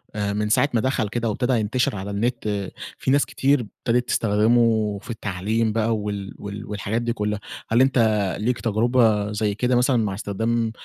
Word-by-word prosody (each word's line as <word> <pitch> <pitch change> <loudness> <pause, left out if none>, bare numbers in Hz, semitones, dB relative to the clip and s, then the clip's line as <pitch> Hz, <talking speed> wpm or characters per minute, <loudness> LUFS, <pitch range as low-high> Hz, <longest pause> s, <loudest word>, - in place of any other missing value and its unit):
آآ، 100 -1 -1
من 105 +1 -1
ساعة 140 - +3
ما 115 - +2
دخل 130 -4 0
كده 115 +1 -1
وابتدى 125 +4 0
ينتشر 120 +3 0
على 100 +1 -5
النت، 105 -2 -2 0.3
في 130 - -1
ناس 140 0 +4
كتير 140 +1 +2
ابتدت 120 +2 -2
تستخدمه 110 -1 +2
في - - -15
التعليم 110 +1 -1
بقى 115 0 +1
وال 100 -2 -4
وال 100 0 -7
والحاجات 105 +2 -2
دي 120 0 -1
كلها، 105 -2 -2 0.3
هل 115 +3 +4
أنت 130 -1 +3 0.4
ليك 120 +3 -1
تجربة 110 -2 +2
زي 105 -1 -1
كده 125 +3 +1
مثلًا 125 +1 +3
مع 105 -4 0
إستخدام 115 +3 -1
110 Hz, 175 wpm, -23 LUFS, 105-120 Hz, 0.4 s, ناس